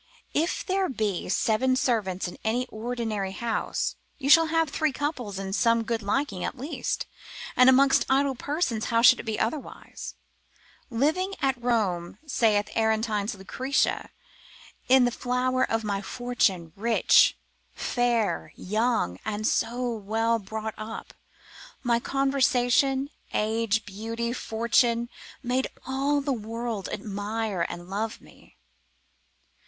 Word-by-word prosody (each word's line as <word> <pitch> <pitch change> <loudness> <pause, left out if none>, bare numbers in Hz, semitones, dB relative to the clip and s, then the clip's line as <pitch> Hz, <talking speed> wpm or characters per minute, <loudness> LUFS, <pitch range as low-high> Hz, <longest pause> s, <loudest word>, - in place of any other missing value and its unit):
If 325 +3 0
there 380 0 +1
be 215 -9 -2
seven 235 +6 +2
servants 205 -8 0
in 175 - -9
an 235 +3 0
ordinary 220 -4 -3
house, 230 +2 -2 0.2
you 275 0 +1
shall 325 +1 +8
have 325 -1 +1
three 310 0 +1
couple 280 -4 -3
in 195 0 -4
some 230 +2 +3
good 225 0 -2
liking 205 -2 -1
at - - -3
least, 275 +6 -3 0.5
and 255 +1 +7
amongst 270 +1 +5
idle 270 +1 +3
persons 265 -4 -1
how 230 -1 +2
should 250 0 +8
it - - -8
be 215 -1 -1
otherwise? 260 +6 -4 0.7
Living 315 +11 0
at 265 -3 0
Rome, 200 -8 0
saith 215 -7 +2
Aretine's 220 -1 +1
Lucretia, 255 +8 -1 0.8
in 260 -1 +7
the 245 - +1
flower 255 +1 0
of 225 0 0
my 200 -2 -1
fortunes, 200 -7 0
rich, 225 +3 +4 0.4
fair, 230 - 0
young, 215 - 0
and 215 0 -3
so 240 +3 0
well 225 +1 0
brought 220 +2 -5
up, 220 +1 -7 0.7
my 235 -2 +2
conversation, 270 +1 +2 0.2
age, 220 0 +1
beauty, 230 +4 -4
fortune, 235 0 +1 0.3
made 255 +1 0 0.2
all 275 +2 +1
the 275 -1 0
world 225 -2 -4
admire 205 -2 -2
and 175 0 -7
love 210 +4 -3
me. - - -19
230 Hz, 125 wpm, -27 LUFS, 215-260 Hz, 0.8 s, shall